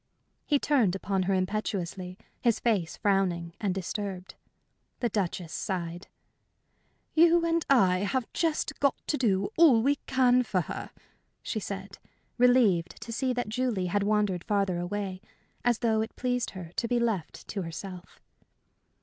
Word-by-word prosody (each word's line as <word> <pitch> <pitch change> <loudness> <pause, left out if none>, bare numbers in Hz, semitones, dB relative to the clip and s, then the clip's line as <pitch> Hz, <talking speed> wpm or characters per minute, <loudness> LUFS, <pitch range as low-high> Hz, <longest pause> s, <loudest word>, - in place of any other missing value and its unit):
He 290 - +4
turned 250 -11 +2
upon 195 0 -1
her - - +3
impetuously, 185 -2 -2 0.2
his 235 -3 +2
face 200 -8 0
frowning 180 -4 +1
and 200 -3 +1
disturbed. 190 0 -4 0.7
The 240 - 0
Duchess 180 -5 -2
sighed. 175 -3 -4 1.1
"You 335 +1 +5
and 335 -1 +1
I 190 -9 +5
have 225 +6 0
just 325 -2 -1
got 280 -1 +3
to - - 0
do 200 -7 +1
all 280 -9 +6
we 285 +2 +3
can 255 -1 +4
for 200 -6 0
her," - - -6 0.5
she 220 - -2
said, 195 -1 -6 0.4
relieved 230 -9 +4
to 230 - -7
see 260 +2 0
that 245 -3 -2
Julie 235 -5 -1
had 205 - +2
wandered 205 -3 +1
farther 195 -4 0
away, 190 +1 -3 0.4
as 240 -2 +3
though 220 -1 +3
it 220 - -5
pleased 250 -1 -1
her 170 -3 -8
to 235 - 0
be 240 +1 +1
left 220 -8 -2
to 200 - -3
herself. 175 +2 -8
205 Hz, 150 wpm, -28 LUFS, 185-245 Hz, 1.1 s, all